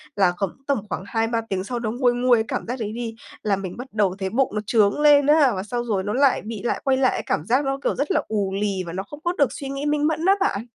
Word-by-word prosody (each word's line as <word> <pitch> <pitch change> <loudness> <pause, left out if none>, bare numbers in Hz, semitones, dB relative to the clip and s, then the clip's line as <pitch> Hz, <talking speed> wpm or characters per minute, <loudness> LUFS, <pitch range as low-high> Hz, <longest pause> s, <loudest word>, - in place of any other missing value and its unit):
là 190 -3 +4
khoảng 195 -3 -1 0.2
tầm 280 - +2
khoảng 190 - -4
2-3 225 +2 0
tiếng 185 -1 -1
sau 240 +4 -4
nó 225 -2 -2
nguôi 245 +1 +2
nguôi 245 0 +3
cái 220 - +1
cảm - - -3
giác 250 +2 -4
đấy 215 -2 -3
đi, 230 -1 -4 0.3
là 205 -2 +2
mình 185 -2 -6
bắt 250 +2 -7
đầu 200 -4 +1
thấy 190 -1 -2
bụng 255 +6 +1
nó 210 - 0
chướng 210 +1 +3
lên 290 -1 +6
á. 295 -3 +5
Và 185 - -3
xong 240 +3 -3
rồi 200 -5 -1
nó 210 - -2
lại 275 0 +3
bị 220 -2 -6
lại 240 - -1
quay 265 -1 +2
lại 260 -1 +3
cái - - -3
cảm 150 - -1
giác 255 +7 +2
nó, 270 0 -1
kiểu, - - 0
rất 285 - -1
là - - +2
ù 200 -3 -1
lì 195 -3 -1
và 170 - -7
nó 190 +1 -3
không 295 +8 -11
có 345 - 0
được 285 -3 +3
suy 275 - -6
nghĩ 275 +1 -4
minh 295 0 +1
mẫn 320 +1 -1
á 385 - +6
bạn. 230 - 0
235 Hz, 300 wpm, -23 LUFS, 200-275 Hz, 0.3 s, lên